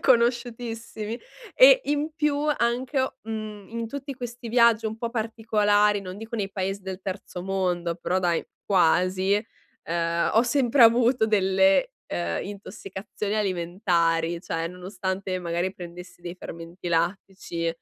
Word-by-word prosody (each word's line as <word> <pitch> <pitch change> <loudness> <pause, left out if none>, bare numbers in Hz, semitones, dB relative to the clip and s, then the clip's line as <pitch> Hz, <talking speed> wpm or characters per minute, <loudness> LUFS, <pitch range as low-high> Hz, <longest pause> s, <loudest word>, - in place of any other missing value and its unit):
conosciutissimi. 235 -2 0 0.4
E - - +8
in 295 +2 0
più 300 -1 +1 0.2
anche, 250 +3 +1
o 260 - -1
mhmm, 215 -2 -6
in 230 0 -3
tutti 280 +1 -6
questi 240 -1 -7
viaggi 235 -1 +4
un 220 0 -4
po' 235 0 -3
particolari, 210 -2 +2
non 185 0 -7
dico 225 +1 -6
nei 200 -3 -2
paesi 195 +1 -2
del 190 0 -6
terzo 190 -2 -5
mondo, 180 -3 -1
però 180 +1 0
dai, 175 -2 +1 0.2
quasi, 185 +1 +3 0.5
ehm, 170 0 0
ho 225 - +6
sempre 250 0 +3
avuto 235 0 +5
delle, 190 -2 +3
ehm, 85 -1 -2
intossicazioni 200 +1 -6
alimentari, 170 -4 +1
cioè 165 -2 -3
nonostante 185 +1 -4
magari 175 +1 -2
prendessi 175 0 -10
dei 175 0 -6
fermenti 170 +1 -8
lattici, 170 0 -1
200 Hz, 130 wpm, -26 LUFS, 180-230 Hz, 0.5 s, E